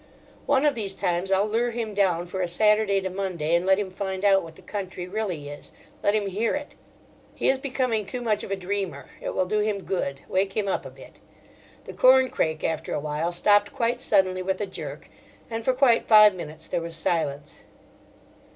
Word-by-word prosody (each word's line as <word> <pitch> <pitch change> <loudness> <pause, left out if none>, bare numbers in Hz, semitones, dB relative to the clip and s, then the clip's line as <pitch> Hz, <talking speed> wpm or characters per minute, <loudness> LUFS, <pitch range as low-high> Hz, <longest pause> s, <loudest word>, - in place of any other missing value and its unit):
One 280 0 +3
of 295 - +4
these 200 -5 -3
times 175 +2 -1
I'll 195 +1 +3
lure 230 +3 0
him 230 -2 -4
down 180 -4 +1
for 185 +2 -4
a 180 - 0
Saturday 210 +2 +3
to 190 - -3
Monday 180 -5 -2
and 170 +2 +2
let 190 0 +5
him 200 -2 -3
find 190 0 -4
out 195 -1 +5
what 165 -1 -11
the - - -17
country 190 -3 -5
really 185 -7 -3
is—let 145 +7 -4
him 210 -1 0
hear 205 +6 -1
it. 290 0 -6 0.6
He - - +1
is 265 - +2
becoming 255 -6 -1
too 250 - -3
much 215 -4 0
of - - -7
a 195 - 0
dreamer: 190 -7 -4 0.2
it - - -4
will 185 - +1
do 210 +3 0
him 210 -2 -1
good, 140 -7 -3
wake 195 +2 -1
him 210 -2 0
up 195 - -2
a - - -9
bit. - - -15 0.6
The - - -9
corncrake 255 - +3
after 160 -1 -2
awhile 150 +3 -2
stopped 205 +3 +3
quite 240 +2 -1
suddenly 190 -6 +2
with 190 +1 -2
a 205 - -1
jerk, 190 - -8 0.4
and 225 0 -3
for 260 - +3
quite 250 -3 +3
five 215 -2 +8
minutes 160 -3 -8
there 170 - -2
was 165 0 -6
silence. 150 -3 -3
195 Hz, 200 wpm, -25 LUFS, 175-215 Hz, 0.6 s, five